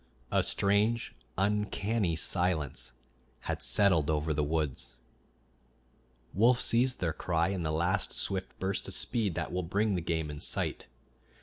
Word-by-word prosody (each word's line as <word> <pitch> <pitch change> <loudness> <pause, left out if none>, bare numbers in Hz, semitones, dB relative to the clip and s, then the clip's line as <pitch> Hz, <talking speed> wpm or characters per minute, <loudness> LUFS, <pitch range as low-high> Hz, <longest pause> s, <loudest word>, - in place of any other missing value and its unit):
A - - +3
strange, 105 +4 +1 0.2
uncanny 105 -1 0
silence 85 -3 -1 0.5
had - - -3
settled 85 -8 +3
over 75 0 +1
the 75 0 0
woods. 75 -3 -2 1.4
Wolves 120 +5 +4
cease 125 +2 +3
their 85 -7 -2
cry 85 0 0
in 95 -2 -2
the 80 -2 -1
last 85 +5 0
swift 95 -1 -2
burst 95 +1 -2
of - - -3
speed 105 -8 0
that - - -3
will 90 - 0
bring 100 +5 0
the 90 - -1
game 80 -2 -2
in 75 - -7
sight. - - -1
90 Hz, 140 wpm, -30 LUFS, 80-105 Hz, 1.4 s, Wolves